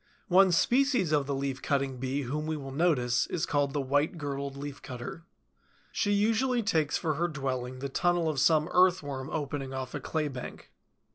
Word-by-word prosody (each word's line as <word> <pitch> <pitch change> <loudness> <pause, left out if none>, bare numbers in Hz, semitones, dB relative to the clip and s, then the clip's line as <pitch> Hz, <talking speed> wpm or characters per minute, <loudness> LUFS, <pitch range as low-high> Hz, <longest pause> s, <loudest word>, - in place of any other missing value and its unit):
One 190 +1 +6
species 245 - +3
of 145 -2 +2
the 140 - -1
Leaf 135 -1 -3
cutting 135 -2 -1
Bee 135 +3 -2
whom 150 +5 -3
we 155 -1 -1
will 135 -2 -7
notice 135 -6 +2
is 170 - -1
called 145 -1 +1
the 145 0 -1
White 145 +5 0
girdled 140 -2 -4
Leaf 145 0 -7
cutter. 130 +6 -7 0.7
She 205 - 0
usually 225 +4 +2
takes 160 -7 +1
for 160 -2 -1
her 170 +4 0
dwelling 130 -5 -3
the 135 +2 -4
tunnel 175 +4 +1
of 155 -3 0
some 155 +2 +4
Earthworm 155 -7 +2
opening 140 -3 -3
off 130 -1 -5
a - - -3
claybank. 145 -6 -4
145 Hz, 180 wpm, -29 LUFS, 135-170 Hz, 0.7 s, One